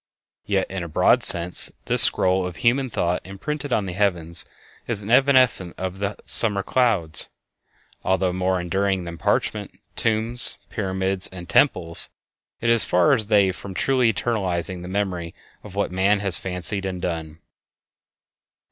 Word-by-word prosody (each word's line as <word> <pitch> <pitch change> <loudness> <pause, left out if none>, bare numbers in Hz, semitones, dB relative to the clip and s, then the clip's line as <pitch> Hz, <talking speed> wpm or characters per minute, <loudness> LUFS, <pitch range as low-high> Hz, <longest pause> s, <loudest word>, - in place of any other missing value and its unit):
Yet, 100 -2 0
in 95 -1 -4
a - - -6
broad 80 - +2
sense, 85 +1 +3
this - - +4
scroll 95 0 +5
of 90 - -8
human 130 +5 +1
thought 90 -5 -1
imprinted 145 +10 -6
on 105 -4 0
the 90 - -5
heavens 85 -5 0 0.4
is 105 -4 -2
as 100 - -8
evanescent 130 -9 +4
as 95 +1 -5
the 100 +1 -3
summer 100 -4 +2
clouds. 100 - +1 0.7
Although 95 -1 0
more 95 0 -1
enduring 95 +2 -1
than 85 -1 -8
parchment, - - -2 0.2
tombs, 115 +2 0
pyramids, 95 -2 -1
and 90 -2 -11
temples, 85 - +1 0.5
it 115 - 0
is 115 -1 +5
as - - +1
far 90 0 +3
as 110 -3 +2
they 100 -3 +3
from 95 +1 -9
truly 130 +1 +2
eternizing 95 -5 -3
the 90 - -8
memory 90 -3 -3 0.3
of 100 -2 -12
what 100 -2 -1
man 95 +3 +2
has 95 -4 +3
fancied 95 +2 -3
and 90 -1 -5
done. 80 -3 -5
95 Hz, 155 wpm, -22 LUFS, 90-105 Hz, 0.7 s, scroll